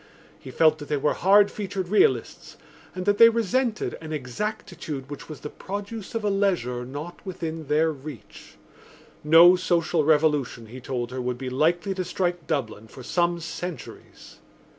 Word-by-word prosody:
He - - -11
felt 155 +4 +3
that 145 - -8
they 150 - 0
were 145 +2 +1
hard 200 +2 +4
featured 195 -3 -4
realists 130 - +1 0.4
and 185 0 -4
that 205 0 +2
they 230 - +10
resented 230 +1 -1
an 160 -1 -8
exactitude 150 - -5
which 145 - -8
was 155 - -9
the 150 - -6
produce 205 +2 -7
of 225 - -2
a - - +2
leisure 175 -12 0
not 150 +6 -8
within 165 -5 -6
their 155 +2 +2
reach. 145 -4 -11 0.7
No 165 +4 +8
social 170 -3 +1
revolution, 150 -6 +1
he 125 +4 -10
told 125 -1 -4
her, 130 0 -4
would 125 0 -3
be 130 0 -5
likely 170 +8 +1
to 185 -1 -3
strike 175 -2 -2
Dublin 115 -8 -3
for 130 +3 -12
some 170 +4 0
centuries. 170 +1 -8
160 Hz, 160 wpm, -25 LUFS, 140-185 Hz, 0.7 s, they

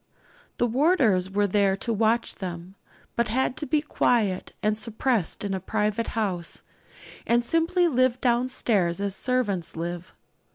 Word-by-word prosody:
The - - +2
warders 240 - +2
were 205 +1 +1
there 195 -1 +2
to 230 +3 -1
watch 225 +2 +1
them, 180 -1 -7 0.4
but 235 0 +1
had 255 +3 0
to 300 -1 -4
be 300 -1 +1
quiet 220 -10 0
and 215 0 +2
suppressed 220 -3 -1
in 200 -1 -2
a 190 - -1
private 210 +3 -1
house, 185 -6 -1 0.6
and 240 +1 +3
simply 330 +6 +2
lived 255 -4 +2
down 245 0 +2
stairs 195 -9 +1
as 200 -1 0
servants 210 -10 -1
live. 175 +2 -5
220 Hz, 150 wpm, -25 LUFS, 190-250 Hz, 0.6 s, and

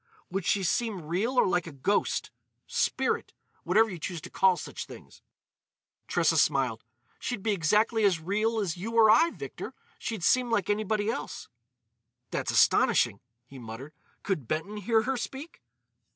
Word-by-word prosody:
"Would 195 -2 -2
she 200 - +2
seem 205 -1 -1
real 210 +11 0
or - - +5
like 180 -2 0
a - - -7
ghost—spirit—whatever 205 +6 -1
you 185 -5 -7
choose 170 +2 -4
to - - -10
call 190 -2 +4
such - - -6
things?" - - -13 0.9
Tressa - - +2
smiled. - - +1 0.4
"She'd 245 -6 -4
be 220 - +1
exactly 210 +5 +2
as 190 -5 +3
real 215 +7 0
as 190 -6 -1
you 220 +6 -5
or 220 -2 +7
I, 285 +10 +5
Victor. - - -8 0.2
She'd 220 -7 -4
seem 250 +5 +3
like 210 -3 +1
anybody 215 +1 0
else." - - -6 0.8
"That's - - -2
astonishing," 100 - +4 0.3
he 135 +1 -12
muttered. 120 +6 -9 0.3
"Could 155 - -2
Benton 160 - -3
hear 220 +2 +2
her 265 +2 -1
speak?" 275 +7 -7
205 Hz, 150 wpm, -28 LUFS, 175-225 Hz, 0.9 s, or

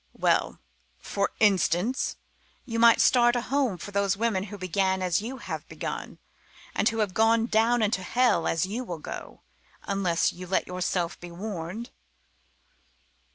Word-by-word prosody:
Well - - +1 0.4
for 200 - -2
instance 200 +3 +2 0.5
you 230 -2 -3
might 230 0 +7
start 240 -1 +5
a 245 - +1
home 260 -6 0
for 205 - -8
those 200 -1 +1
women 210 -4 0
who 205 0 -8
began 190 +1 0
as 180 +1 +1
you 250 +5 -5
have - - -6
begun, - - -5 0.6
and 215 - +2
who 225 - -4
have 210 -4 0
gone 225 +2 +3
down 230 +1 +2
into 205 -2 +1
hell, 245 -5 +2
as 165 +1 +1
you 220 +7 -4
will 175 -8 -5
go 155 - -8 0.4
unless 185 -4 +1
you 180 +1 -9
let 190 - +1
yourself 180 -1 -2
be 175 - -9
warned." 190 +3 -6
200 Hz, 155 wpm, -27 LUFS, 180-230 Hz, 0.6 s, might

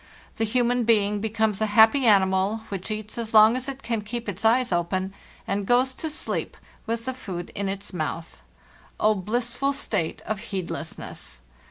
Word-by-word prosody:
The 225 - +1
human 245 +2 +2
being 210 -2 +2
becomes 220 -1 0
a 220 - +2
happy 230 +4 +7
animal, 195 +1 +3
which 195 0 -5
eats 215 +1 -5
as 225 -1 -3
long 215 +2 +8
as 255 +1 -3
it 275 0 -7
can 230 -2 -1
keep 230 +2 -5
its 200 0 -5
eyes 240 +2 +3
open, 185 +2 -1 0.3
and 195 0 -1
goes 255 +2 +3
to 320 +4 -4
sleep 305 - -3 0.3
with 230 0 -2
the 260 - -2
food 180 -8 -6
in 200 -1 -2
its 195 0 -6
mouth. 165 0 -4 0.6
Oh, 215 0 +4
blissful 240 +7 -1
state 165 -11 -2
of 215 -2 -2
heedlessness! 165 - -6
215 Hz, 170 wpm, -25 LUFS, 195-235 Hz, 0.6 s, long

